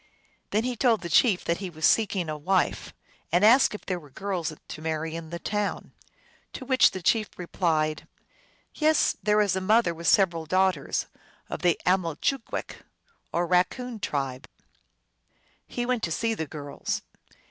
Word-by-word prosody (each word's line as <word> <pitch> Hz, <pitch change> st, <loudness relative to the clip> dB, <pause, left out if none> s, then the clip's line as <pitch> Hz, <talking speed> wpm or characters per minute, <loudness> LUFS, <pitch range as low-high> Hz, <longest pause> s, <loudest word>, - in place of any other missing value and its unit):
Then 215 Hz, +2 st, +1 dB
he 250 Hz, 0 st, -2 dB
told 235 Hz, -2 st, +2 dB
the 170 Hz, -, -5 dB
chief 200 Hz, -, +4 dB
that 170 Hz, -, 0 dB
he 195 Hz, -2 st, -4 dB
was 160 Hz, -2 st, -2 dB
seeking 200 Hz, -6 st, +2 dB
a 155 Hz, -, -3 dB
wife, 180 Hz, +5 st, 0 dB, 0.4 s
and 175 Hz, +5 st, +4 dB
asked 240 Hz, 0 st, +6 dB
if -, -, -10 dB
there 185 Hz, -2 st, -2 dB
were 150 Hz, -3 st, -16 dB
girls 180 Hz, +1 st, -3 dB, 0.2 s
to 155 Hz, -, -7 dB
marry 160 Hz, 0 st, -3 dB
in 165 Hz, -1 st, -7 dB
the 170 Hz, -, -5 dB
town. 205 Hz, +3 st, -3 dB, 0.6 s
To 260 Hz, -, -7 dB
which 260 Hz, 0 st, +5 dB
the 185 Hz, -, -7 dB
chief 215 Hz, +3 st, +2 dB
replied, 160 Hz, -3 st, -1 dB, 0.4 s
" -, -, -31 dB, 0.3 s
Yes, 310 Hz, 0 st, +2 dB
there 210 Hz, 0 st, +3 dB
is 200 Hz, -2 st, +1 dB
a 190 Hz, -, -1 dB
mother 210 Hz, -2 st, +3 dB
with 170 Hz, +1 st, -6 dB
several 170 Hz, -5 st, +3 dB
daughters, 185 Hz, -4 st, +1 dB, 0.5 s
of -, -, -4 dB
the 175 Hz, -2 st, +2 dB
AmalchoogwecK 185 Hz, -, -1 dB, 0.5 s
or 175 Hz, +1 st, 0 dB
Raccoon 220 Hz, +7 st, 0 dB
tribe." 135 Hz, -7 st, -3 dB, 1.2 s
He 245 Hz, -, -3 dB
went 250 Hz, -2 st, 0 dB
to 165 Hz, -, -2 dB
see 225 Hz, +7 st, 0 dB
the 160 Hz, -8 st, -4 dB
girls. 145 Hz, -1 st, -5 dB
185 Hz, 165 wpm, -26 LUFS, 160-215 Hz, 1.2 s, asked